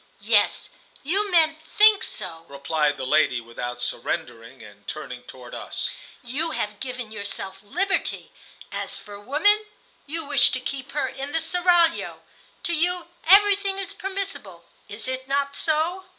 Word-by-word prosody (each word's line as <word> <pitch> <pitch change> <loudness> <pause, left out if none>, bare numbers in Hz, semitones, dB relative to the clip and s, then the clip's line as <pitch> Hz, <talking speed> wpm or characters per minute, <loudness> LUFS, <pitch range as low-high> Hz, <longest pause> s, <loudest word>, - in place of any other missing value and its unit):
"Yes, - - +2 0.3
you 395 +8 0
men 320 -3 +4
think 420 +4 +6
so," 170 -6 -6
replied 145 +1 0
the 130 - -4
lady, 130 -3 +3
without 120 +1 -6
surrendering, 120 0 -4
and 105 -1 -15
turning 125 -5 -6
toward 125 -2 -11
us. - - -3 0.3
"You 280 +7 -1
have 210 0 -3
given 250 -4 -5
yourself 195 -2 -5
liberty. 370 - -1 0.4
As - - -4
for 205 -1 -10
woman, 410 - +3 0.4
you 320 +1 -3
wish 280 -2 +5
to 260 - +1
keep 270 +1 -5
her 295 - 0
in 275 +2 -6
the 325 - +2
seraglio. 345 0 +2 0.4
To 345 - +1
you, 345 +1 0 0.2
everything 395 +1 +6
is 390 0 -3
permissible. 390 - -5 0.2
Is 210 +3 -7
it 260 0 -3
not 280 +1 0
so?" 330 +5 0
275 Hz, 145 wpm, -24 LUFS, -, 0.4 s, think